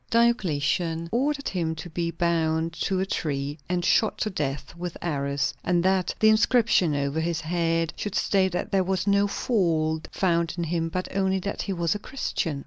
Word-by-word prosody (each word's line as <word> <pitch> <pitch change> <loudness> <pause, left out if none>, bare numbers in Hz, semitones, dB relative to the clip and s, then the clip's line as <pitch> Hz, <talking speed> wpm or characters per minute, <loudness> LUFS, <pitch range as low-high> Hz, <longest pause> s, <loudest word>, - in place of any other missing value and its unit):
Diocletian 170 - +1
ordered 280 +4 0
him 165 -4 -1
to 160 - -7
be 170 0 -2
bound 165 -1 0
to 190 +2 -1
a 190 - +1
tree 145 -4 -3
and 180 -1 0
shot 220 - +3
to 215 - -1
death 145 -3 -3
with 175 0 -5
arrows, 140 -3 -1
and 175 -1 +2
that 190 -1 +2
the 220 - +6
inscription 215 - +3
over 140 +2 -1
his 165 0 -1
head 165 -1 0
should 205 -1 -4
state 190 -2 +2
that 180 - -3
there 195 -1 +3
was 185 0 -1
no 200 0 +3
fault 160 -8 0
found 170 -3 +1
in 170 - -1
him 165 0 -1
but 185 +2 -4
only 190 -1 +2
that 200 +2 -3
he 195 - -2
was 170 -2 0
a 210 - -4
Christian. 170 - -3
170 Hz, 185 wpm, -26 LUFS, 160-195 Hz, -, the